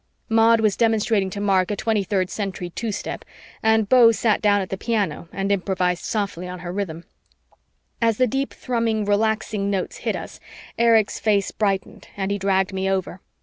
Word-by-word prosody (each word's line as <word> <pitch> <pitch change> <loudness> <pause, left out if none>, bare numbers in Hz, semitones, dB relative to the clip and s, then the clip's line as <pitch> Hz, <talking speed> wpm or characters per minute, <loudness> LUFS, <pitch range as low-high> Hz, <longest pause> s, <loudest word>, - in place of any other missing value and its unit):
Maud 225 0 +4
was 210 -3 +2
demonstrating 220 -3 +1
to 200 +2 -6
Mark 195 -3 +2
a 205 - -1
23rd 200 -4 0
Century 190 -4 -4
two 225 +4 -3
step - - -5 0.4
and 220 -1 +3
Beau 240 0 +7
sat 220 -1 +1
down 205 -1 +3
at 190 - -5
the - - -1
piano 195 -7 -2
and 195 +1 -2
improvised 185 -2 0
softly 195 -4 -2
on 180 0 -6
her 175 -1 -5
rhythm. 175 -4 -4 1.0
As 230 -2 +2
the 255 - +4
deep 270 +3 -2
thrumming 230 -4 -1
relaxing 210 -1 0
notes 195 -2 -2
hit - - -2
us, - - -8 0.4
Erich's 225 -2 +3
face 205 -3 +1
brightened 195 -3 -2
and 195 0 -2
he 200 - -1
dragged 190 0 +1
me 190 0 -1
over. 190 -1 -2
205 Hz, 175 wpm, -22 LUFS, 190-220 Hz, 1.0 s, Beau